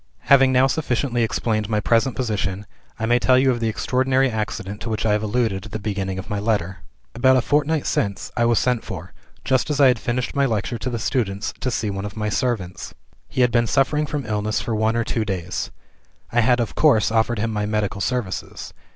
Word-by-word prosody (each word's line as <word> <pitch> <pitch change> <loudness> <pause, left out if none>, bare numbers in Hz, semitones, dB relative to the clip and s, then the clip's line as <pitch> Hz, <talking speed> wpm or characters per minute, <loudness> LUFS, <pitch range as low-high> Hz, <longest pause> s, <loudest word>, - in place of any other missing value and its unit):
"Having 135 -1 +7
now 130 +1 +4
sufficiently 125 -3 0
explained 110 -1 -1
my 105 -1 +1
present 115 +3 +2
position, 105 -5 -2 0.3
I 110 - -2
may 120 +2 +3
tell 130 +1 +4
you 130 0 +4
of 120 - -2
the 115 - 0
extraordinary 130 +3 +1
accident 105 -2 -4
to 115 - -4
which 110 0 -2
I 110 - +3
have 105 0 +2
alluded 110 -3 -1
at - - -15
the 110 - -3
beginning 100 -3 -3
of 95 - -6
my 105 - -2
letter. 100 -4 -1 0.3
"About 130 +1 +4
a - - +4
fortnight 150 +3 +1
since, 100 -2 -1
I 120 - +2
was 120 -1 +3
sent 125 -1 +1
for, - - -8 0.3
just 130 +2 +1
as 145 -2 -1
I 135 -2 +7
had 125 -3 +1
finished 125 +5 -2
my 140 -1 +3
lecture 115 +1 -2
to 130 - -3
the 120 - -3
students, 110 -4 -1
to 130 - -1
see 110 -4 -1
one 95 +1 -4
of 105 +1 -7
my 105 -1 -1
servants. 105 -6 -2 0.3
He 130 - -1
had 125 -1 +4
been 120 -1 +2
suffering 150 +4 +1
from 145 -2 -3
illness 105 0 -1
for 115 - -3
one 110 +1 +1
or 115 - +1
two 115 -1 -1
days. 95 -3 -3 0.6
I 120 - +3
had 120 +2 +3
of 115 - -2
course 125 -9 +3
offered 115 +1 +1
him 110 +1 -1
my 105 -1 -1
medical 105 -2 -1
services. 120 -7 -3
115 Hz, 220 wpm, -22 LUFS, 105-125 Hz, 0.6 s, Having